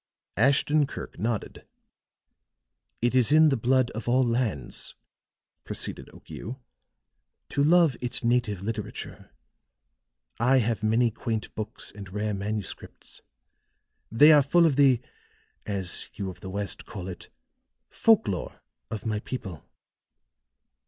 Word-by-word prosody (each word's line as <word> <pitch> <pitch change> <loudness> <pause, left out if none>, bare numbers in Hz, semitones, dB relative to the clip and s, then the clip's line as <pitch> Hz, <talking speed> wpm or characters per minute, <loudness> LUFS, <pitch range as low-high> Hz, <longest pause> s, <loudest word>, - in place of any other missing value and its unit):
Ashton 140 +5 +3
Kirk - - -8
nodded. 110 -1 -3 1.4
"It 120 - +2
is 130 +1 +4
in 155 +1 +7
the 135 - +2
blood 130 +1 +2
of 115 +1 -5
all 130 +1 +4
lands," 115 - -2 0.7
proceeded - - -5
Okiu, 125 +6 -9 0.9
"to 140 - +1
love 165 -3 +5
its 125 +1 -2
native 115 -5 +1
literature. 110 0 -6 1.1
I 125 +3 +4
have 115 -3 0
many 115 +2 +2
quaint 110 0 -4
books 110 0 -6
and 100 -2 -10
rare 105 +1 -2
manuscripts; 100 0 -6 0.9
they 145 +8 +7
are 150 -2 +7
full 170 +5 +4
of 155 -5 +3
the, 135 -4 +4 0.7
as 95 -4 -2
you 100 -2 -4
of - - -15
the 95 - -8
West 100 +1 -4
call 95 -3 -7
it, 90 -2 -8 0.6
folk 225 - +3
lore 95 -3 -4 0.3
of 110 +2 -6
my 110 -2 -1
people. 95 - -7
115 Hz, 125 wpm, -27 LUFS, 105-130 Hz, 1.4 s, in